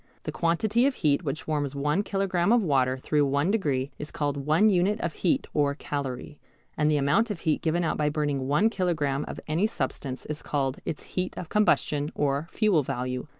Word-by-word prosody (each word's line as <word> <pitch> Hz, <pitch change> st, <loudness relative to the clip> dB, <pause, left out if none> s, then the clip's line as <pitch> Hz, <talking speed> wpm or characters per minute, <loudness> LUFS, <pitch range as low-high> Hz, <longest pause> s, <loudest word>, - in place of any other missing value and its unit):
The -, -, -4 dB
quantity 215 Hz, +9 st, +2 dB
of 280 Hz, -, -1 dB
heat 150 Hz, +1 st, +1 dB
which 150 Hz, 0 st, -4 dB
warms 145 Hz, -3 st, -1 dB
one 150 Hz, +6 st, +1 dB
kilogram 195 Hz, -2 st, 0 dB
of 240 Hz, -2 st, +4 dB
water 130 Hz, -5 st, +2 dB
through 145 Hz, +2 st, +1 dB
one 140 Hz, +6 st, +1 dB
degree 145 Hz, -10 st, 0 dB
is 150 Hz, -, -6 dB
called 145 Hz, -1 st, -2 dB
one 160 Hz, +8 st, +5 dB
unit 200 Hz, +2 st, +2 dB
of 170 Hz, -5 st, -2 dB
heat 175 Hz, -, +1 dB
or 145 Hz, -2 st, +2 dB
calorie, 140 Hz, -1 st, -5 dB, 0.4 s
and 150 Hz, -1 st, +2 dB
the 150 Hz, -, +3 dB
amount 145 Hz, +12 st, +2 dB
of 205 Hz, -5 st, -4 dB
heat 155 Hz, -3 st, 0 dB
given 170 Hz, +2 st, +1 dB
out 160 Hz, -, 0 dB
by 150 Hz, -1 st, +1 dB
burning 145 Hz, -3 st, -1 dB
one 150 Hz, +11 st, +3 dB
kilogram 155 Hz, -8 st, 0 dB
of -, -, -6 dB
any 165 Hz, +7 st, +2 dB
substance 135 Hz, -, -4 dB
is 150 Hz, -1 st, -5 dB
called 135 Hz, -2 st, -1 dB
its 155 Hz, -, -4 dB
heat 185 Hz, 0 st, -4 dB
of 170 Hz, -, -6 dB
combustion 150 Hz, -8 st, +2 dB
or 145 Hz, +2 st, 0 dB
fuel 210 Hz, -8 st, +2 dB
value. 125 Hz, 0 st, -3 dB
150 Hz, 195 wpm, -27 LUFS, 140-180 Hz, 0.4 s, one